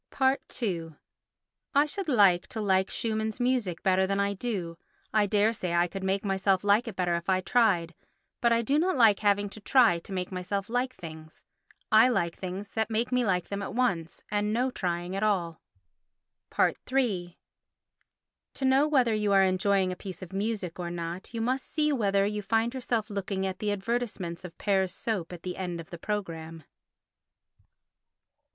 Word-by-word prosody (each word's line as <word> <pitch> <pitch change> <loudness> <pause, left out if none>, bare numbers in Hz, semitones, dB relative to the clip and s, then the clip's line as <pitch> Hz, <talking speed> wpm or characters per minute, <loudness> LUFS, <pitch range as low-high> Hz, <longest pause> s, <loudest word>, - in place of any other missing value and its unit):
ii 170 -6 -1 0.9
I 285 +1 +6
should 375 +5 -4
like 200 -9 +4
to 225 - -6
like 190 -2 +2
Schumann's 220 0 -2
music 245 -9 0
better 190 0 +3
than 195 +1 0
I 200 0 +1
do; 185 -6 -4 0.3
I 210 -1 +3
dare 210 +2 +3
say 180 -5 -3
I 175 0 +4
could 195 +2 -7
make 195 +2 0
myself 195 -1 +1
like 205 +4 +3
it 220 - -5
better 180 -2 0
if 170 +2 -2
I 185 -1 +3
tried; 185 -5 +2 0.5
but 235 - +3
I 230 0 +3
do 280 +6 +2
not 360 -2 +1
like 220 -5 +6
having 205 -1 +2
to 215 - -10
try 220 -5 +4
to 170 - -12
make 185 -1 -3
myself 190 +2 -3
like 250 +2 -1
things; 160 -2 -11 0.5
I 220 +3 +7
like 175 -8 0
things 190 +2 -6
that 220 +1 -1
make 230 +3 -1
me 250 -1 +2
like 180 -5 0
them 200 0 -3
at 200 - -5
once 185 -10 -1
and 210 0 0
no 250 +4 +1
trying 175 -3 -3
at 195 - -2
all. 180 -6 0 1.0
iii 205 -10 0 1.2
To 270 - -2
know 265 +3 +4
whether 255 -7 +3
you 210 -1 +1
are 195 0 +6
enjoying 190 0 +2
a - - -4
piece 185 -1 -8
of 185 +1 -10
music 195 -4 -2
or 175 -1 -3
not 170 +1 -5
you 230 -1 -3
must 255 +3 -1
see 300 -1 +1
whether 200 -5 +2
you 210 +1 -2
find 225 +4 +1
yourself 235 -4 -2
looking 195 -1 -2
at 190 -1 -3
the 210 -1 -1
advertisements 205 -5 -3
of 180 -2 -10
Pear's 190 -3 +1
soap 195 -8 -3
at 175 -2 -9
the 180 -1 -5
end 175 -2 -4
of 165 - -10
the 170 - -7
programme. 165 -6 -4
200 Hz, 180 wpm, -28 LUFS, 180-225 Hz, 1.2 s, I